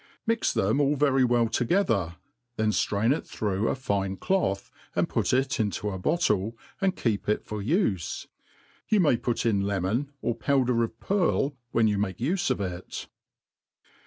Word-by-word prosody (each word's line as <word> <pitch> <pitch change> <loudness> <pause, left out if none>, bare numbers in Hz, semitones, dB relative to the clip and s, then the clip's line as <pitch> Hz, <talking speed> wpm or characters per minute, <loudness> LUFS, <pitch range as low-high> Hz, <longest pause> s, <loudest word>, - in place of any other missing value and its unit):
Mi} 230 - +3 0.2
them 110 +9 +2
all 145 +1 +3
very 135 -2 +3
well 120 -2 +3
together; 115 - +1 0.4
then 110 -1 +1
ftrain 105 +5 +2
it - - -5
through 105 0 -1
9 - - +1
fine 100 -7 -1
cloth, 100 - 0 0.2
and - - +2
put - - 0
it 130 +1 +1
into 105 -1 -1
a 95 - -5
bottle, 110 - +1 0.2
and 190 -1 +2
keep 105 -4 -1
it 105 - 0
for 105 -1 -5
ufe, 110 - 0 0.7
Yoa 215 - +5
may 155 -9 +4
put 120 0 -2
in 105 -4 +2
^emori, 100 +7 0 0.2
or 120 - 0
powdrr 125 -1 +2
of 115 0 -5
pearl, 170 -7 +1
when 115 -2 +3
you 105 -2 +1
make 95 -2 -1
ufe 165 +9 0
of 130 - 0
it. 90 -3 -5
115 Hz, 165 wpm, -27 LUFS, 100-140 Hz, 0.7 s, Yoa